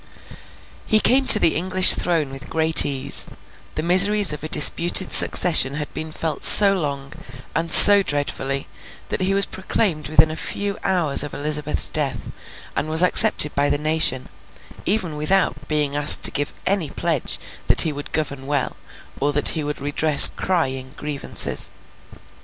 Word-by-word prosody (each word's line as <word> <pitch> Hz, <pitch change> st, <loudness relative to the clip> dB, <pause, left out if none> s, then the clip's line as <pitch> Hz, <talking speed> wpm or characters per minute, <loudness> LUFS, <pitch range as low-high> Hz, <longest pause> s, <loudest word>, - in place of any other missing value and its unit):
He 215 Hz, -, +1 dB
came 260 Hz, +4 st, +1 dB
to -, -, +7 dB
the 165 Hz, -, 0 dB
English 185 Hz, +2 st, +4 dB
throne 160 Hz, -6 st, -4 dB
with 135 Hz, 0 st, -13 dB
great 160 Hz, 0 st, +2 dB
ease. 135 Hz, -2 st, -1 dB, 0.5 s
The 155 Hz, -, -6 dB
miseries 190 Hz, +2 st, +2 dB
of 150 Hz, -, -10 dB
a 155 Hz, -, -8 dB
disputed 170 Hz, +5 st, +3 dB
succession 150 Hz, -6 st, +3 dB
had 150 Hz, 0 st, -9 dB
been 155 Hz, 0 st, -9 dB
felt 155 Hz, -2 st, -7 dB
so 200 Hz, -1 st, +6 dB
long, 140 Hz, -6 st, -7 dB, 0.4 s
and 165 Hz, +1 st, -5 dB
so 205 Hz, 0 st, +9 dB
dreadfully, 140 Hz, -4 st, -6 dB, 0.4 s
that -, -, -6 dB
he 190 Hz, +1 st, -3 dB
was 200 Hz, -1 st, -1 dB
proclaimed 185 Hz, -4 st, -5 dB
within 155 Hz, +1 st, +1 dB
a -, -, -8 dB
few 200 Hz, +4 st, -6 dB
hours 175 Hz, -7 st, 0 dB
of 145 Hz, -, -8 dB
Elizabeth's 150 Hz, 0 st, -2 dB
death, 135 Hz, -7 st, -4 dB, 0.4 s
and 155 Hz, -, -5 dB
was 160 Hz, +2 st, +3 dB
accepted 180 Hz, -5 st, +4 dB
by 145 Hz, +1 st, -2 dB
the -, -, -2 dB
nation, 155 Hz, -4 st, -1 dB, 0.6 s
even 180 Hz, -7 st, -3 dB
without 150 Hz, -3 st, -3 dB
being 150 Hz, -2 st, -3 dB
asked 145 Hz, 0 st, +5 dB
to -, -, +5 dB
give 145 Hz, 0 st, -5 dB
any 190 Hz, -6 st, -2 dB
pledge 160 Hz, -3 st, -4 dB, 0.3 s
that -, -, +3 dB
he 160 Hz, -, -3 dB
would 145 Hz, 0 st, -11 dB
govern 140 Hz, -3 st, -6 dB
well, 145 Hz, -2 st, -5 dB, 0.4 s
or 145 Hz, +1 st, -2 dB
that 145 Hz, -, +1 dB
he 155 Hz, -, -4 dB
would 150 Hz, 0 st, -7 dB
redress 145 Hz, +1 st, +5 dB
crying 130 Hz, -8 st, -5 dB
grievances. 150 Hz, -2 st, -2 dB
155 Hz, 160 wpm, -18 LUFS, 145-180 Hz, 0.6 s, so